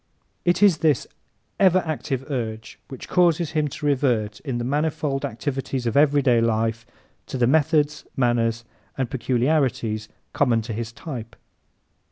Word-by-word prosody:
It 175 +3 +3
is 185 -7 +5
this 150 -5 +2 0.5
ever 185 -1 +4
active 135 -4 -3
urge 110 -4 -4
which 135 -3 -9
causes 170 -2 +2
him 155 -2 +1
to 150 +2 -7
revert, 125 -7 +1
in 135 -5 -4
the 120 - -2
manifold 145 +1 -1
activities 135 0 -3
of 115 - -1
everyday 140 -5 +4
life, 115 +1 0 0.4
to - - -4
the 125 - +3
methods, 150 +1 +2
manners 115 -2 +1 0.3
and 130 -3 -2
peculiarities 120 -4 0 0.2
common 120 -5 +2
to 115 0 -5
his 115 +1 -4
type. 115 -4 -8
130 Hz, 140 wpm, -23 LUFS, 115-150 Hz, 0.5 s, is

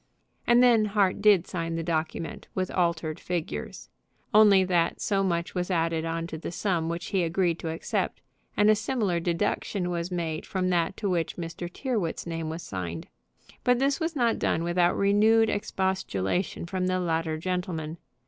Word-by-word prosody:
And 240 +1 +6
then 230 -3 +5
Hart 200 -2 +1
did 200 -4 +5
sign 165 -2 -3
the 165 - -2
document 160 0 -3
with 185 -1 -1
altered 170 -3 0
figures: 175 -3 -4 0.5
only 205 -3 +7
that 175 -2 +1
so 195 -1 +1
much 170 -2 -1
was 180 0 -2
added 165 -2 0
on 165 0 -2
to 160 -2 -6
the 170 - -5
sum 175 -4 -1
which 170 0 -4
he 195 - +1
agreed 170 0 0
to 165 - -4
accept, 160 - -2 0.4
and 210 +1 +6
a - - +5
similar 215 -5 0
deduction 175 +2 -1 0.2
made 165 -3 -3
from 185 -1 -1
that 175 +1 0
to 210 - -2
which 175 -3 -1
Mr. 170 0 -6
Tyrrwhit's 220 -8 -2
name 165 -2 -3
was 165 +2 -5
signed. 85 -3 -5 0.5
But 250 0 +4
this 275 +4 +1
was 325 -1 -2
not 235 -4 +1
done 165 - 0
without 175 0 +2
renewed 215 +3 +4
expostulation 190 - -1
from 185 +1 -2
the 185 0 +1
latter 165 -2 -1
gentleman. 170 -2 -3
175 Hz, 165 wpm, -27 LUFS, 165-200 Hz, 0.5 s, only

